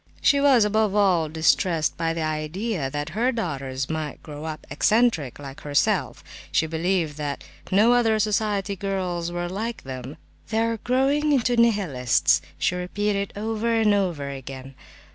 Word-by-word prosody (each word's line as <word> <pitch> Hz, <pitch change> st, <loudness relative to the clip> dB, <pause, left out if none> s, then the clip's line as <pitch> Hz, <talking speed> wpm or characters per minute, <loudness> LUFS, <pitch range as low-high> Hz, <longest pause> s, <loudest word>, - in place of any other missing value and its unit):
She 280 Hz, 0 st, +3 dB
was, 265 Hz, -6 st, +5 dB
above 210 Hz, -1 st, +1 dB
all 180 Hz, -6 st, +3 dB
distressed 160 Hz, +1 st, +1 dB
by 165 Hz, -1 st, -1 dB
the 165 Hz, -, -2 dB
idea 155 Hz, +2 st, -2 dB
that 145 Hz, +3 st, -4 dB
her 230 Hz, +10 st, +1 dB
daughters 135 Hz, -, -3 dB
might 155 Hz, -2 st, -4 dB
grow 150 Hz, 0 st, -8 dB
up 155 Hz, -1 st, -6 dB
"eccentric," 210 Hz, -, +2 dB
like 140 Hz, -1 st, -9 dB
herself; 145 Hz, -1 st, 0 dB, 0.3 s
she 160 Hz, -, +2 dB
believed 165 Hz, -1 st, -1 dB
that 145 Hz, -2 st, -4 dB, 0.3 s
no 215 Hz, +5 st, +5 dB
other 225 Hz, -3 st, +3 dB
society 210 Hz, -2 st, 0 dB
girls 180 Hz, -3 st, -2 dB
were 175 Hz, 0 st, -3 dB
like 220 Hz, +6 st, -4 dB
them. 130 Hz, +1 st, -7 dB, 0.3 s
"They 220 Hz, 0 st, +1 dB
are 230 Hz, 0 st, 0 dB
growing 270 Hz, +6 st, +1 dB
into 245 Hz, -2 st, +2 dB
Nihilists!" 195 Hz, -, +3 dB, 0.2 s
she -, -, +1 dB
repeated 200 Hz, +2 st, -2 dB
over 220 Hz, +2 st, -1 dB
and 220 Hz, -2 st, +3 dB
over 175 Hz, -8 st, 0 dB
again. 135 Hz, -1 st, -8 dB
180 Hz, 150 wpm, -24 LUFS, 150-220 Hz, 0.3 s, was